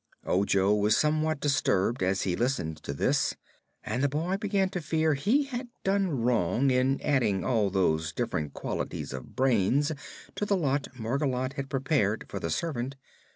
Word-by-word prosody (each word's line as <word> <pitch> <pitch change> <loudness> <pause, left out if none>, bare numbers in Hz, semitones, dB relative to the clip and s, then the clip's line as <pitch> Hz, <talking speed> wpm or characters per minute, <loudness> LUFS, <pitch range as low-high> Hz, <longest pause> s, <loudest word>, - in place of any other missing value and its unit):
Ojo 100 +1 +2
was 105 +1 +3
somewhat 155 0 +1
disturbed 120 -7 +1
as 95 +1 +1
he 90 -2 0
listened 90 - -1
to - - -6
this, 70 - +1 0.5
and 110 +4 -2
the 140 - +3
boy 165 +7 -1
began 195 -1 +1
to 180 -2 -4
fear 160 0 +1
he 215 - +2
had 255 -2 -5 0.2
done 190 -10 +1
wrong 120 +2 +2
in 130 +2 +2
adding 120 -9 +1
all 110 -5 +2
those 80 -4 +1
different 75 -2 -3
qualities 70 -2 -4
of 65 -1 -8
brains 130 - +2 0.4
to - - -4
the 200 -1 +2
lot 140 -4 0
Margolotte 130 +2 -1
had 135 0 -5
prepared 130 -6 0
for 100 - -5
the 85 - -3
servant. 135 - -2
130 Hz, 160 wpm, -28 LUFS, 100-155 Hz, 0.5 s, was